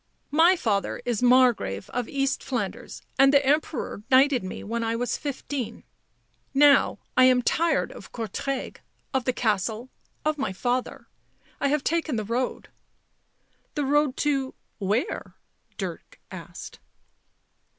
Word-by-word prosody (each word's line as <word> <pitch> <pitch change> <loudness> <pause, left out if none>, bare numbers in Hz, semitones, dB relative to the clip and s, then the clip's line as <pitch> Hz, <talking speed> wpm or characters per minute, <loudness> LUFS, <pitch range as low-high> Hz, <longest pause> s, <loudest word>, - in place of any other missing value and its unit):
" - - -44
My 370 +2 +6
father 210 - -1
is 240 -3 -1
Margrave 245 - +3
of 245 -2 -3
East 275 -1 -1
Flanders, 235 -7 -4 0.2
and 270 0 +7
the 280 -1 +4
Emperor 290 -6 0
knighted 265 -2 +5
me 185 - -6
when 230 +2 -2
I 225 0 0
was 245 +1 -1
fifteen. 265 -4 -5 0.7
Now 285 0 +5 0.2
I 255 - +7
am 250 -1 +4
tired 335 +6 +1
of - - -12
Courtrai, 245 +4 -4 0.4
of 265 -2 0
the 255 - +2
castle, 220 +2 -1 0.3
of 310 -1 0
my 270 - -1
father. 245 +6 -2 0.5
I 280 - +1
have 290 0 +1
taken 325 -4 0
the 215 - -1
road." 245 +4 -2 0.5
" - - -43
The 295 -2 0
road 290 -1 +2
to 275 -3 0
— - - -46
where 240 - -1 0.2
?" - - -41
Dirk - - -6
asked. - - -9
255 Hz, 145 wpm, -26 LUFS, 230-280 Hz, 0.7 s, and